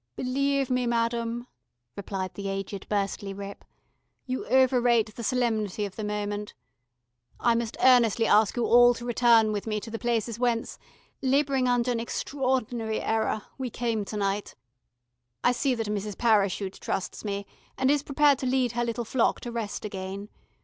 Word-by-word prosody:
"Believe 275 +1 0
me, 250 -1 +1
madam," 235 0 -1 0.5
replied 190 -2 -4
the 200 -1 -5
aged 195 0 -5
Burstley 200 -1 -2
Ripp. 200 0 -8 0.6
"You 255 0 -4
overrate 245 -4 +3
the 235 - -8
solemnity 220 -4 0
of 195 - -8
the 215 - -5
moment. 210 0 -3 0.8
I 235 - +3
must 230 0 -2
earnestly 235 -3 +5
ask 210 -1 +4
you 240 -2 0
all 245 +1 +6
to 235 - -8
return 235 -2 +4
with 210 +1 -3
me 215 -1 -1
to 225 - -9
the 225 - -4
places 235 -1 -1
whence 240 -2 -1 0.4
labouring 270 -1 +2
under 245 0 +2
an 235 - -1
extraordinary 245 -3 -1
error 220 -1 0 0.2
we 260 -1 -2
came 230 -3 -1
to 210 - -5
night. 200 0 -2 0.9
I - - +5
see 255 +1 0
that 225 -1 -2
Mrs. 210 -1 -3
Parachute 200 -4 +1
trusts 190 - -3
me, 200 -1 -3 0.3
and 265 +1 +3
is 290 -1 +2
prepared 285 -1 +3
to 260 - -2
lead 255 -2 +1
her 240 0 -1
little 235 0 -2
flock 235 +1 +1
to 240 - -6
rest 225 -3 -4
again. 195 0 -6
230 Hz, 165 wpm, -27 LUFS, 210-250 Hz, 0.9 s, all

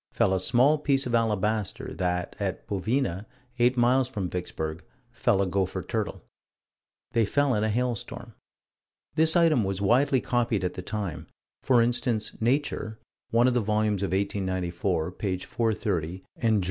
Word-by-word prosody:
fell 95 - +2
a 95 - +1
small 130 +10 +4
piece 140 -2 +1
of 125 - -3
alabaster; 110 -2 0
that, 90 -1 -2
at 95 -2 -3
Bovina, 105 0 -1 0.3
eight 125 +2 +3
miles 125 +2 +3
from 100 -9 -4
Vicksburg, 80 -2 -4 0.3
fell 120 -4 +2
a - - 0
gopher 95 0 -1
turtle. - - -3 0.9
They 115 - +3
fell 140 +5 +2
in 105 - +1
a 110 - +1
hailstorm. 120 0 -3 0.8
This 160 +2 +4
item 165 -8 +4
was 95 -1 -2
widely 130 +7 +3
copied 120 -6 0
at 90 - -1
the - - -6
time: 100 -3 -4 0.3
for 120 -3 +4
instance, 120 -2 0
Nature, 120 -3 0 0.3
one 120 +2 +4
of 130 - +3
the 120 - +2
volumes 105 -1 0
of 100 - 0
1894, 95 -3 -1
page 95 -1 -3
430, 100 -7 -1
and 110 -2 +2
_Jour. - - +2
110 Hz, 155 wpm, -27 LUFS, 95-120 Hz, 0.9 s, small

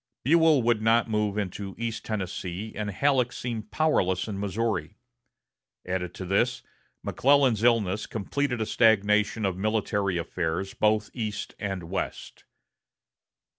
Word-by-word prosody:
Buell 160 -2 +5
would 115 -2 +2
not 115 +1 +3
move 105 -1 0
into 100 -1 -4
East 115 -1 -3
Tennessee, 95 0 -4
and 105 -1 -3
Halleck 125 +3 +2
seemed 115 -4 -5
powerless 95 - +1
in 100 -3 -4
Missouri. 100 -3 -2 0.9
Added 90 -1 -3
to 95 - -6
this, 120 +7 +1 0.4
McClellan's 135 -5 +3
illness 110 -4 +2
completed 125 +3 -2
a - - +1
stagnation 105 -1 +3
of 95 -2 -1
military 100 -2 0
affairs 85 +2 -2
both 110 0 +1
east 110 -4 -4
and 95 -3 -3
west. 85 +4 -5
105 Hz, 125 wpm, -27 LUFS, 95-115 Hz, 0.9 s, Buell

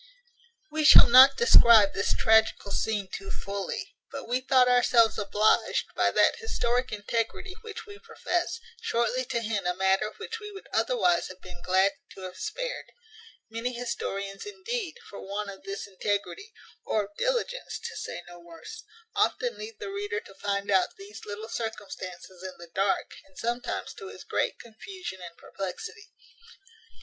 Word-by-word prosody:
We 310 0 -1
shall 300 - +10
not 260 +3 +9
describe 230 - +7
this 200 - +1
tragical 220 -2 +3
scene 205 -1 -1
too 195 0 -6
fully; 200 0 -5 0.2
but 275 -3 -7
we 250 +2 0
thought 255 -1 +4
ourselves 245 -3 +4
obliged, 210 +1 +2
by - - +3
that - - +3
historic 250 - -1
integrity 225 - -2
which 450 0 -8
we 410 -1 -11
profess, 450 -6 -2 0.2
shortly 240 +2 0
to 235 - -2
hint 210 -4 -2
a 180 - 0
matter 190 +3 +2
which 455 - -6
we 420 -1 -8
would 390 -1 -11
otherwise 470 -8 +2
have 185 0 -11
been 180 -1 -12
glad 190 +2 +3 0.2
to 190 - -11
have 185 -1 -7
spared. - - -4 0.7
Many 230 +3 -3
historians, 200 -5 -4
indeed, 415 -2 -4
for 200 - -9
want 200 +1 -4
of 195 - -12
this 195 0 -5
integrity, 205 - -3 0.3
or 215 - 0
of 205 +1 -13
diligence, - - -1
to - - -5
say - - -6
no 175 0 -12
worse, 170 -1 -11 0.3
often 485 -1 +1
leave 430 0 -8
the 415 -2 -6
reader 410 +3 -3
to 195 - -15
find 200 +1 -2
out 190 -2 +2
these 205 +2 -11
little 210 +2 -6
circumstances 195 -5 -6
in 185 0 -7
the 170 -1 -13
dark, 195 0 0
and 190 - -24
sometimes 240 +2 -3
to - - -9
his - - -10
great - - -1
confusion 235 - -9
and 170 -1 -10
perplexity. 420 - -7
225 Hz, 160 wpm, -28 LUFS, -, 0.7 s, shall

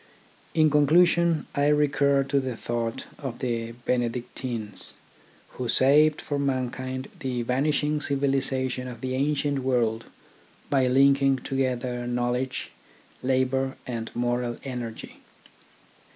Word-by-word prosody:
In 155 -2 +4
conclusion, 165 +2 +4
I 140 0 +2
recur 140 -2 +3
to 140 +1 +1
the 130 -3 -3
thought 115 -1 -3 0.2
of 130 -5 -5
the 115 -2 -2
Benedictines, 120 -2 -3 0.5
who 125 - -5
saved 150 +5 +4
for 145 -1 -2
mankind 130 -1 -2
the 125 -2 -2
vanish 140 +5 +1
ing 150 0 0
civilisation 135 -2 0
of 120 -2 -8
the 130 0 -2
ancient 140 +1 0
world 120 -4 0 0.7
by 135 -2 +3
linking 135 +1 +4
together 125 -2 -2
knowledge, 125 +1 -2 0.5
labour, 130 +1 0
and 115 -3 -4
moral 120 0 -1
energy. 125 -4 -6
130 Hz, 110 wpm, -26 LUFS, 120-140 Hz, 0.7 s, In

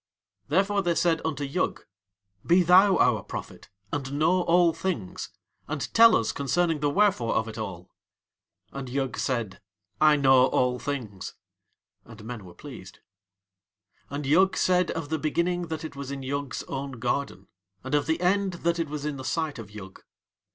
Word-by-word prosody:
Therefore 195 +6 +2
they 175 -3 0
said 165 -1 +2
unto 155 -2 -2
Yug: 145 +7 -2 0.6
"Be 180 +2 +4
thou 185 +3 +6
our 110 -4 +3
prophet, - - -8 0.2
and 140 -1 -3
know 165 +5 +2
all 175 -1 +4
things, 160 - -4 0.4
and 150 -2 -4
tell 230 -1 +7
us - - +1
concerning 160 +4 0
the 145 0 +1
wherefore 145 - +2
of 110 +1 0
It 110 0 -7
All." 90 -4 -7 0.8
And 135 -2 -6
Yug 135 0 -2
said: 110 -7 -2 0.4
"I 155 -1 +6
know 130 -2 +5
all 125 -1 +1
things." 115 -10 -5 0.7
And 115 -1 -13
men 115 -4 -7
were 90 - -13
pleased. 125 -10 -11 1.1
And 145 +1 -4
Yug 185 +7 +3
said 180 -2 +2
of 165 -3 -4
the 160 0 -1
Beginning 170 +3 -1
that 160 0 -5
it 155 - -8
was 140 -1 -6
in 140 -1 -5
Yug's 140 0 -3
own 135 0 -5
garden, 120 -4 -3 0.4
and 130 +2 -6
of 145 - +2
the 160 +1 0
End 190 +1 +1
that 170 0 -1
it 165 -3 -2
was 150 -1 -5
in 150 -2 -3
the 130 - -7
sight 155 -1 -2
of 110 -3 -9
Yug. 100 -2 -11
145 Hz, 170 wpm, -26 LUFS, 125-170 Hz, 1.1 s, tell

